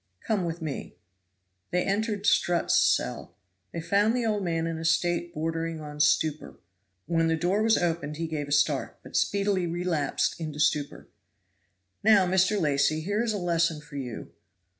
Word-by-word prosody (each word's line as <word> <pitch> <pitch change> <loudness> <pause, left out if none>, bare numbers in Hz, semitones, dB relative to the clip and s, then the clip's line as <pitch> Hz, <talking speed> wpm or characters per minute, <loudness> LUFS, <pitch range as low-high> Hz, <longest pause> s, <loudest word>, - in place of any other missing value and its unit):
"Come 205 -5 -1
with 165 0 -4
me." 150 -3 -5 0.7
They 180 +1 +1
entered 205 0 -1
Strutt's 175 -4 +2
cell. 60 +1 +1 0.4
They 170 - -4
found 200 +7 +2
the 245 -2 0
old 210 -3 0
man 165 -2 -1
in 165 -1 -3
a - - -6
state 170 +1 +1
bordering 165 +1 -3
on 150 -1 -8
stupor. 150 +1 +1 0.5
When 165 -1 +1
the 165 - +2
door 180 +6 0
was 220 0 +4
opened 165 -4 -2
he 165 - -2
gave 155 -3 -4
a - - -8
start, 145 -1 +1
but - - -11
speedily 200 -3 +1
relapsed 170 -4 -1
into 155 -2 -5
stupor. 150 -1 0 1.0
"Now, 205 -3 +6
Mr. 190 +3 +2
Lacy, 150 -1 +1
here 205 +6 -1
is 235 - 0
a 210 - -2
lesson 170 -3 0
for 150 0 -14
you. 125 -5 -6
165 Hz, 165 wpm, -27 LUFS, 155-190 Hz, 1.0 s, Now